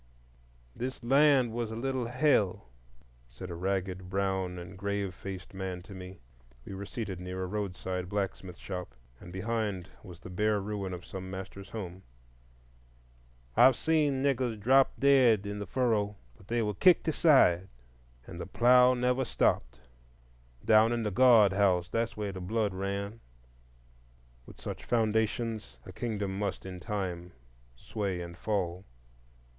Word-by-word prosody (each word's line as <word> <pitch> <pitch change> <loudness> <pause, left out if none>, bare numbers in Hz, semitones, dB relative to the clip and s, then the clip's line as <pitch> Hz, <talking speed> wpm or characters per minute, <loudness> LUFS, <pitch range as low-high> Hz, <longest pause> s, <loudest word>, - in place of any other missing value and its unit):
"This 130 +1 -5
land 135 -1 +4
was 115 -1 -3
a 110 - -5
little 130 0 -2
Hell," 125 - +1 0.6
said 95 -1 -9
a - - -5
ragged, 95 0 -2
brown, 95 -1 -1
and 90 +2 -9
grave 100 -1 -2
faced 95 +1 -8
man 95 -2 -5
to 100 +1 -11
me. 95 0 -9 0.5
We - - -7
were 100 +1 -6
seated 105 -6 -5
near 90 +1 -5
a - - -1
roadside 90 -2 -4
blacksmith 95 -3 -3
shop, 90 -10 -6 0.2
and 85 - -11
behind 100 -1 -2
was 90 -5 -11
the 90 - -10
bare 105 +3 +1
ruin 100 -1 -4
of 90 -1 -7
some 95 -1 -7
master's 95 +1 -8
home. 95 -4 -7 1.5
"I've 130 0 +7
seen 150 -4 +1
niggers 130 -5 0
drop 130 +5 +5
dead 130 -7 +5
in 100 0 -4
the 100 - -5
furrow, 105 -3 0 0.2
but 95 - -19
they 120 +1 0
were 105 -1 -1
kicked 175 - +4
aside, 130 - +4 0.6
and - - -8
the - - -6
plough 125 +1 +5
never 125 +1 +1
stopped. - - 0 0.8
Down 110 +1 +5
in 120 -1 -1
the 105 - -1
guard 110 -3 +6
house, 95 -3 +2
there's 115 -1 -2
where 105 -2 -2
the 95 -1 -7
blood 105 +2 -1
ran." 100 +3 -4 1.3
With - - -13
such - - -6
foundations 110 - 0
a - - -9
kingdom 100 -4 -3
must 100 -2 -3
in 90 -1 -7
time 90 -3 -4 0.4
sway 95 - -3
and 85 0 -7
fall. 90 -2 -2
100 Hz, 150 wpm, -30 LUFS, 95-115 Hz, 1.5 s, I've